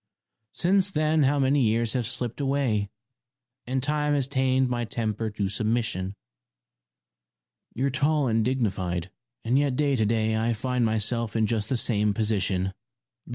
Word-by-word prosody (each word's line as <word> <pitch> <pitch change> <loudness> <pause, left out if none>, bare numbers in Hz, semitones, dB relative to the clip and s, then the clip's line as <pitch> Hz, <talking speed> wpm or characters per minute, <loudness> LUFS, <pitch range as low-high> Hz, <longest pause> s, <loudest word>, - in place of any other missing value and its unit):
Since 190 +2 +2
then 155 -3 +1
how 145 +1 +3
many 140 +1 +2
years 115 -1 +1
have 125 -4 -1
slipped 120 +1 -3
away? 135 -7 0 0.8
And 130 0 -1
time 150 0 +1
has 140 -3 +2
tamed 130 -1 +1
my 120 -1 -1
temper 110 -2 -2
to 105 -2 -2
submission. 100 -2 -1 1.6
You're 135 +2 0
tall 145 +2 +1
and 115 -1 +2
dignified, 95 -8 -1 0.3
and 125 +4 +3
yet 140 -3 0
to 145 -2 +2
day 110 0 +1
I 115 +2 +1
find 125 +2 -1
myself 110 +1 0
in 110 -1 +2
just 110 -1 -1
the 130 - +1
same 105 -3 +1
position. 95 -3 0
120 Hz, 145 wpm, -26 LUFS, 110-135 Hz, 1.6 s, how